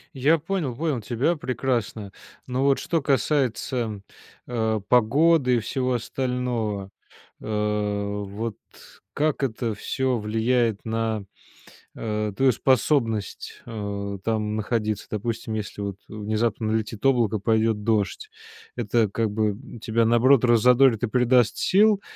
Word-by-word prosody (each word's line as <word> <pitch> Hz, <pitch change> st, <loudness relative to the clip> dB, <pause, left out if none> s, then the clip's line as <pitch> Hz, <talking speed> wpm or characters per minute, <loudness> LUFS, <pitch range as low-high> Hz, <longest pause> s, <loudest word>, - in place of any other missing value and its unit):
Я 145 Hz, +5 st, +3 dB
понял, 160 Hz, -5 st, -3 dB
понял 150 Hz, -3 st, -1 dB
тебя 125 Hz, +10 st, 0 dB
прекрасно. 125 Hz, -8 st, -2 dB, 0.3 s
Но, 130 Hz, +1 st, -1 dB
вот, 140 Hz, -1 st, +4 dB
что 165 Hz, -2 st, -1 dB
касается, 130 Hz, -6 st, 0 dB, 0.5 s
а, 110 Hz, -3 st, 0 dB
погоды 125 Hz, +5 st, +3 dB
и -, -, +2 dB
всего 130 Hz, +3 st, -1 dB
остального, 120 Hz, -5 st, -2 dB, 0.5 s
а, 105 Hz, -1 st, -1 dB
вот, 105 Hz, +2 st, -5 dB, 0.6 s
как 150 Hz, -1 st, 0 dB
это 115 Hz, -2 st, -1 dB
всё 130 Hz, +4 st, -1 dB
влияет 110 Hz, +1 st, 0 dB
на, 110 Hz, -2 st, -2 dB, 0.7 s
а, 105 Hz, -2 st, -2 dB
твою 130 Hz, +5 st, +3 dB
способность, 115 Hz, -, 0 dB
а, 100 Hz, -3 st, -4 dB
там 110 Hz, -1 st, -1 dB
находиться? 110 Hz, -1 st, -2 dB
Допустим, 115 Hz, +1 st, -3 dB
если, 105 Hz, -1 st, -5 dB
вот, 100 Hz, -1 st, -3 dB
внезапно 110 Hz, +1 st, -1 dB
налетит 110 Hz, +1 st, -3 dB
облако, 120 Hz, -6 st, +3 dB
пойдет 110 Hz, 0 st, +1 dB
дождь. 110 Hz, -, 0 dB, 0.5 s
Это, 115 Hz, -3 st, +1 dB
как 110 Hz, +1 st, -1 dB
бы, 105 Hz, 0 st, +1 dB
м, 115 Hz, +3 st, -10 dB
тебя, 115 Hz, +1 st, +1 dB
наоборот, 120 Hz, +3 st, +4 dB
раззадорит 125 Hz, 0 st, +5 dB
и -, -, +2 dB
придаст 125 Hz, 0 st, +3 dB
сил, 205 Hz, +1 st, +4 dB
115 Hz, 120 wpm, -24 LUFS, 105-130 Hz, 0.7 s, раззадорит